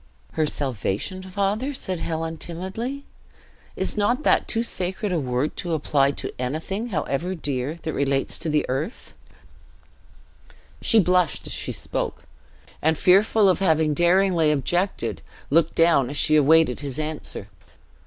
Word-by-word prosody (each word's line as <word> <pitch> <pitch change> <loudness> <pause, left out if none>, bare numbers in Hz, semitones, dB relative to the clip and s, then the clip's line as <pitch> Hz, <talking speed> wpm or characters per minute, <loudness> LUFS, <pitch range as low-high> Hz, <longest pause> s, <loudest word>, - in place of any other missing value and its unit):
'" - - -34
"Her 155 -1 0
salvation, 135 - -2
father?" 200 +8 -2
said 185 -7 -3
Helen, 165 0 -3
timidly. 195 - -5 0.7
"Is - - -2
not 240 +7 +1
that - - +3
too 230 0 -1
sacred 190 -1 -1
a 175 - +1
word 130 +1 -1
to 175 -2 -3
apply 140 -2 +2
to 140 - -3
anything, 160 - -3
however 175 - -2
dear, 140 -2 -3
that 160 - -3
relates 135 -1 0
to 150 -2 0
earth?" 145 - -4 1.7
She 225 - +4
blushed 180 -4 +2
as - - -4
she - - -3
spoke; - - -4 0.6
and 160 0 +2
fearful 200 +4 +4
of 185 - +3
having 160 -5 +2
too 160 - -1
daringly 175 -3 +4
objected, 150 - -1 0.3
looked 165 +1 +3
down 165 -6 +4
as 145 - -4
she 155 - +4
awaited 155 -2 +4
his 140 -2 -6
answer. 155 0 -5
165 Hz, 145 wpm, -23 LUFS, 145-190 Hz, 1.7 s, She